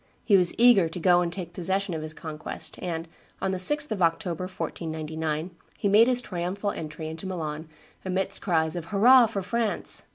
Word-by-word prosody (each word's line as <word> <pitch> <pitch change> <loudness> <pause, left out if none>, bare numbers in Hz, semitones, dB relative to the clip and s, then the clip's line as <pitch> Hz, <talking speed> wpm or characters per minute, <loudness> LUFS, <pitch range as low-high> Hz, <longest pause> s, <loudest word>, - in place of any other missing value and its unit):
He 205 - +5
was 180 -2 +3
eager 230 -8 +6
to 175 - -6
go 175 +1 +4
and 170 -1 -1
take 175 -2 -7
possession 190 +1 -1
of 160 - -3
his 155 0 -7
conquest, 155 -2 -6
and, 165 -2 -4 0.3
on 190 - -1
the 185 - -2
6th 295 +9 +2
of 205 -3 -2
October, 170 +1 0
1499, 160 -2 -4 0.3
he - - -1
made 215 +4 +6
his 250 -1 +1
triumphal 185 +2 -3
entry 155 0 -6
into 160 +4 -6
Milan 160 -3 -5 0.3
amidst 190 0 0
cries 160 -4 0
of 170 -2 -4
"Hurrah! 235 +7 +6
for 200 -3 -4
France." 230 +2 -1
180 Hz, 185 wpm, -26 LUFS, 160-200 Hz, 0.3 s, eager